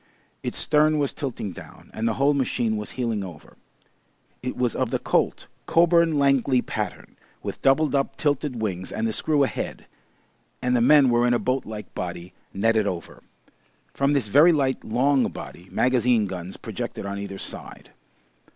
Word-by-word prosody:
Its - - -4
stern 155 +1 +3
was 145 -2 0
tilting 130 -8 -4
down, - - -13
and 110 +1 -1
the - - 0
whole 140 +2 +3
machine 125 -5 0
was 105 -1 -5
heeling 115 -5 -2
over. 85 -5 -11 0.9
It 125 - -4
was 125 -3 +1
of - - 0
the - - 0
Colt - - 0 0.2
Coburn 170 -2 +4
Langley 135 -2 +3
pattern, - - -5 0.3
with - - -5
double 145 +2 +3
up 135 0 0
tilted 145 -4 -1
wings 95 -4 -3
and 110 - -1
the 110 - -2
screw 150 +2 +2
ahead, 135 - -3 0.7
and 125 0 +1
the 120 - +3
men 135 0 +6
were 120 +1 +3
in 120 - +3
a - - +3
boat 130 +2 -1
like 105 -1 -8
body 90 0 -6 0.2
netted 110 +1 +2
over. 85 -3 -5 0.7
From 140 +1 +1
this 140 -7 +1
very 150 - +6
light 135 -4 0
long 130 +4 +2
body, 90 +2 -9
magazine 125 -3 +2
guns 95 -1 -6
projected - - -6
on 100 0 -4
either 100 -1 -6
side. - - -6
125 Hz, 170 wpm, -24 LUFS, 105-140 Hz, 0.9 s, men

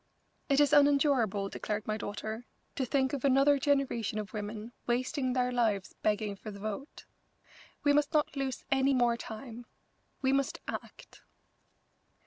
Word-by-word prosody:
"It 275 0 +4
is 290 -1 +4
unendurable," 275 -9 +4
declared 210 +1 -4
my 215 - -1
daughter, 215 +3 -5 0.3
"to 260 -2 -1
think 265 0 +1
of 275 - -3
another 275 +1 +4
generation 265 -6 +1
of 210 -1 -5
women 215 +2 -5 0.2
wasting 255 +2 0
their 250 -1 +1
lives 220 -6 0
begging 210 -1 0
for 215 - -9
the 200 - -8
vote. 215 +7 -6 0.8
We 290 0 +4
must 295 0 +2
not 300 -2 +1
lose 270 -2 -3
any 270 0 +3
more 240 -2 +3
time. 235 +1 -8 0.6
We 265 0 +3
must 280 +5 0
act." - - -8
250 Hz, 145 wpm, -31 LUFS, 215-275 Hz, 0.8 s, It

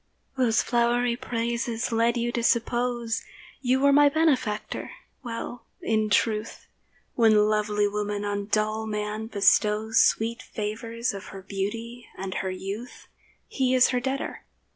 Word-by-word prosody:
Those 245 -4 +2
flowery 240 0 +2
praises 235 0 -2
led 230 +1 +2
you 240 0 0
to 240 - -1
suppose 240 0 0 0.4
You 260 0 +2
were 280 +1 +4
my 290 0 +6
benefactor. 280 -9 0 0.3
Well, 240 0 -6
in 215 -1 0
truth, 215 +1 0 0.5
When 215 -3 +4
lovely 210 -1 +1
woman 205 0 -2
on 205 0 -2
dull 215 +1 0
man 210 +1 -3
bestows 210 +1 +3
Sweet 230 +2 +1
favours 230 +2 -3
of 195 0 -7
her 195 -1 -10
beauty 225 +5 -5
and 190 0 -4
her 190 - -2
youth, 195 +6 -6 0.4
He 260 -1 +1
is 255 - +5
her 250 - +1
debtor. 265 +2 -3
225 Hz, 135 wpm, -26 LUFS, 210-240 Hz, 0.5 s, my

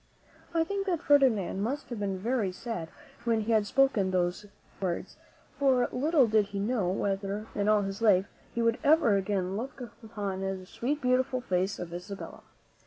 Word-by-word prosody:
I 330 -1 +2
think 395 +3 -3
that 350 -4 +1
Ferdinand 250 -10 +3
must 270 +8 -3
have 240 -3 -5
been 195 -2 -1
very 220 -1 0
sad 180 -4 -5 0.3
when 230 -2 +1
he 220 +2 -2
had 215 -2 +3
spoken 265 -7 +3
these 180 +2 -1 0.3
words; 180 -3 -3 0.4
for 260 -3 +3
little 285 +2 +3
did 215 -2 +3
he 200 0 -5
know 205 -3 0
whether, 200 +2 -2
in 205 +1 0
all 210 -1 +4
his 195 +2 -5
life, 195 -4 +5 0.3
he 235 - -1
would 230 0 +2
ever 295 -8 +5
again 195 -1 -1
look 260 +5 -6 0.2
upon 205 -4 -4
the 195 -1 -3
sweet, 280 +10 -3
beautiful 255 +1 +2
face 190 -3 0
of 170 -1 -6
Isabella. 180 +3 -7
210 Hz, 175 wpm, -29 LUFS, 195-255 Hz, 0.4 s, life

